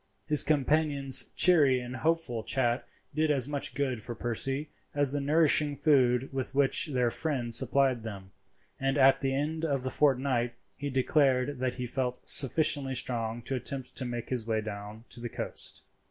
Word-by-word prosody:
His 150 -1 +5
companion's 145 -2 +3
cheery 145 -8 +4
and 125 +1 -7
hopeful 160 -7 -1
chat 120 +1 -1 0.3
did 155 +1 0
as 135 -4 +4
much 145 -1 -3
good 130 -5 -2
for 120 +2 -7
Percy 135 +6 -3 0.2
as 145 -2 +1
the 145 - -1
nourishing 150 0 +2
food 130 -4 +2
with 135 0 -4
which 140 +3 +2
their 125 -5 0
friend 130 -7 -3
supplied 130 0 +3
them; 100 -4 -9 0.5
and 135 +1 -1
at 135 -1 +4
the 135 -1 -1
end 155 +3 -3
of 140 -5 -1
the 130 - -3
fortnight 130 -4 +1 0.2
he 145 0 -5
declared 130 0 +1
that 130 -1 -2
he 125 - -4
felt 125 0 -3
sufficiently 140 -1 +2
strong 120 -2 -2
to - - -4
attempt 130 +1 -5
to 130 - -2
make 120 -1 -5
his 120 -3 -3
way 110 -1 0
down 105 +1 -8
to 125 - -7
the 120 0 -6
coast. - - -3
135 Hz, 170 wpm, -29 LUFS, 120-145 Hz, 0.5 s, His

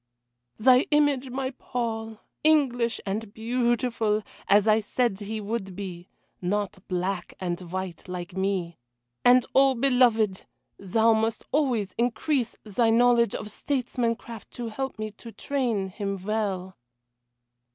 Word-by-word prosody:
"Thy 255 +4 +5
image, 290 -3 +2
my 260 +1 -2
Paul! 225 -3 -4 0.2
English 255 -7 +3
and 205 +2 -3
beautiful, 230 -1 0 0.2
as 205 +2 +5
I 215 0 +5
said 220 -1 0
he 215 +1 -4
would 205 -3 -4
be 180 -3 -7 0.3
not 205 +2 -1
black 185 0 -2
and 175 -1 -3
white 185 -2 -5
like 180 -1 -6
me. 190 -4 -1 0.4
And 250 0 +6
oh! 270 0 +5
beloved, 235 -6 +3 0.3
thou 220 +4 +3
must 220 0 0
always 250 -9 +1
increase 245 +2 0
thy 225 +2 +1
knowledge 235 -1 +4
of 210 - -6
statesmancraft 235 -3 -2
to 240 -2 -4
help 265 +4 -4
me 215 0 -4
to 230 +3 -12
train 230 -4 -1
him 195 +1 -3
well." 195 -4 -2
225 Hz, 125 wpm, -26 LUFS, 195-245 Hz, 0.4 s, And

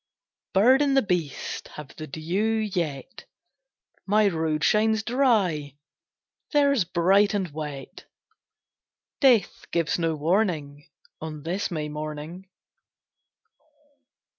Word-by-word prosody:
Bird 250 +8 +5
and 275 -2 +2
the 270 - +4
beast 175 -8 -3
Have 150 -2 -10
the 155 - -7
dew 180 +10 -1 0.2
yet; 160 - -4 0.8
My 210 +1 +4
road 160 -3 -1
shines 220 +1 +2
dry, 205 - +1 0.8
Theirs 280 - +3
bright 190 +4 +3
and 190 -5 -2
wet: 150 -3 -7 1.1
Death 245 - +3
gives 170 0 0
no 165 -1 0
warning, 155 -3 -1 0.3
On 155 -2 -7
this 180 +5 -2
May 155 -4 -3
morning. 155 +4 -7
175 Hz, 100 wpm, -25 LUFS, 155-215 Hz, 1.1 s, Bird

